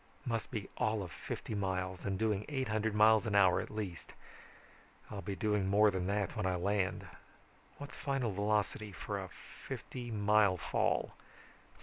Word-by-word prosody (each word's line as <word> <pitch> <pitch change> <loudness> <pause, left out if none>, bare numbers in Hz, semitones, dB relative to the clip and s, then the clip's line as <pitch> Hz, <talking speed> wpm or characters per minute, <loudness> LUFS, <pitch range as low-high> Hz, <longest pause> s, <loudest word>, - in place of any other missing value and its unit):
Must 115 -3 -2
be 110 -5 -4
all 110 -1 +1
of 90 - -8
fifty 70 +9 -5
miles, 95 -2 -2
and 95 -1 0
doing 105 -1 +1
eight 130 -5 -2
hundred 110 0 0
miles 110 0 +6
an 105 - 0
hour 95 -3 +5
at - - -7
least. 105 -5 -5 1.0
I'll 100 - -5
be 100 -1 -4
doing 105 0 +1
more 105 +2 +5
than 95 -1 -2
that 100 +1 -1
when 105 -4 0
I 90 - +1
land. 95 +1 0 0.7
What's 145 0 -8
final 135 -5 -1
velocity 105 +1 0
for 100 +1 -4
a 95 -1 -6
fifty 120 +5 -8
mile 105 -3 +3
fall? - - 0
105 Hz, 160 wpm, -34 LUFS, 95-110 Hz, 1.0 s, miles